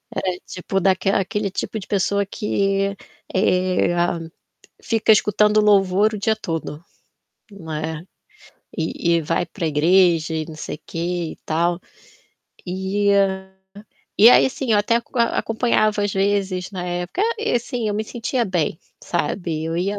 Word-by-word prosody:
Era 180 Hz, -1 st, -2 dB
tipo 195 Hz, +1 st, -3 dB
daquela 190 Hz, +1 st, +2 dB
aquele 200 Hz, +1 st, -2 dB
tipo 220 Hz, -, -4 dB
de 190 Hz, -, -9 dB
pessoa 200 Hz, 0 st, +1 dB
que, 195 Hz, -1 st, -1 dB, 0.4 s
eh, 185 Hz, -2 st, +2 dB, 0.9 s
fica 225 Hz, -1 st, +3 dB
escutando 210 Hz, 0 st, +3 dB
louvor 205 Hz, +1 st, +3 dB
o -, -, -3 dB
dia 220 Hz, +2 st, +1 dB
todo, 165 Hz, -5 st, -5 dB, 0.7 s
não 175 Hz, -6 st, -10 dB
é. 160 Hz, +1 st, -4 dB, 0.7 s
E 170 Hz, +1 st, 0 dB
e -, -, 0 dB
vai 165 Hz, +3 st, -1 dB
para 170 Hz, -1 st, -4 dB
igreja 165 Hz, +1 st, +3 dB
e 160 Hz, -1 st, -2 dB
não 160 Hz, -1 st, -10 dB
sei 150 Hz, -, -6 dB
o -, -, -19 dB
quê -, -, -8 dB, 0.3 s
e -, -, -10 dB
tal. 170 Hz, +2 st, 0 dB, 0.9 s
Eh, 190 Hz, 0 st, 0 dB, 0.7 s
e 225 Hz, +4 st, +9 dB
aí -, -, +6 dB
assim, 260 Hz, -3 st, -2 dB
eu 205 Hz, -, +4 dB
até 230 Hz, +3 st, +2 dB
aco 235 Hz, +1 st, -5 dB
acompanhava 220 Hz, -2 st, +1 dB
às 205 Hz, -, -1 dB
vezes, 195 Hz, -1 st, 0 dB
na 180 Hz, -2 st, -5 dB
época 175 Hz, -, -3 dB
ah, 465 Hz, +1 st, +1 dB
e 445 Hz, -, -1 dB
assim, 240 Hz, -1 st, -2 dB
eu 205 Hz, -, -1 dB
me 215 Hz, +1 st, -2 dB
sentia 240 Hz, +1 st, -2 dB
bem, 170 Hz, -5 st, -1 dB, 0.2 s
sabe. 165 Hz, -1 st, -2 dB
Eu 165 Hz, +1 st, -2 dB
ia 200 Hz, +3 st, -1 dB
195 Hz, 155 wpm, -21 LUFS, 175-210 Hz, 0.9 s, e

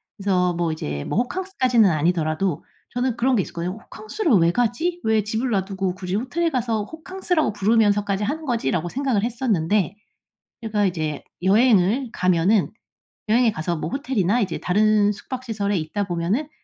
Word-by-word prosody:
그래서 185 Hz, -3 st, +1 dB
뭐 170 Hz, -1 st, -1 dB
이제 75 Hz, -, -4 dB
뭐 -, -, -2 dB
호캉스까지는 255 Hz, -, +1 dB
아니더라도 160 Hz, +1 st, 0 dB, 0.3 s
저는 245 Hz, -1 st, -1 dB
그런 255 Hz, +2 st, +2 dB
게 210 Hz, -, +3 dB
있었거든요. 180 Hz, +3 st, -5 dB
'호캉스를 275 Hz, -, -4 dB
왜 170 Hz, -4 st, +5 dB
가지? 245 Hz, -, 0 dB
왜 220 Hz, -1 st, +2 dB
집을 220 Hz, +5 st, -2 dB
놔두고 190 Hz, -3 st, -1 dB
굳이 185 Hz, -1 st, -5 dB
호텔에 265 Hz, -, -1 dB
가서 230 Hz, -5 st, -1 dB
호캉스라고 325 Hz, -, -2 dB
부르면서까지 205 Hz, -1 st, +2 dB
하는 310 Hz, +9 st, -3 dB
거지?'라고 205 Hz, -, -1 dB
생각을 255 Hz, -3 st, 0 dB
했었는데 210 Hz, -, 0 dB, 0.7 s
제가 215 Hz, -2 st, 0 dB
이제 155 Hz, -5 st, -2 dB, 0.2 s
여행을 215 Hz, +4 st, +3 dB
가면은 185 Hz, +3 st, +2 dB, 0.6 s
여행에 230 Hz, +1 st, +4 dB
가서 170 Hz, -2 st, -2 dB
뭐 155 Hz, +1 st, -4 dB
호텔이나 245 Hz, -, 0 dB
이제 185 Hz, -6 st, -1 dB
다른 210 Hz, +2 st, +3 dB
숙박 255 Hz, +5 st, -7 dB
시설에 205 Hz, -4 st, -1 dB
있다 175 Hz, +6 st, -2 dB
보면은 185 Hz, -, -1 dB
210 Hz, 380 characters per minute, -22 LUFS, 180-245 Hz, 0.7 s, 왜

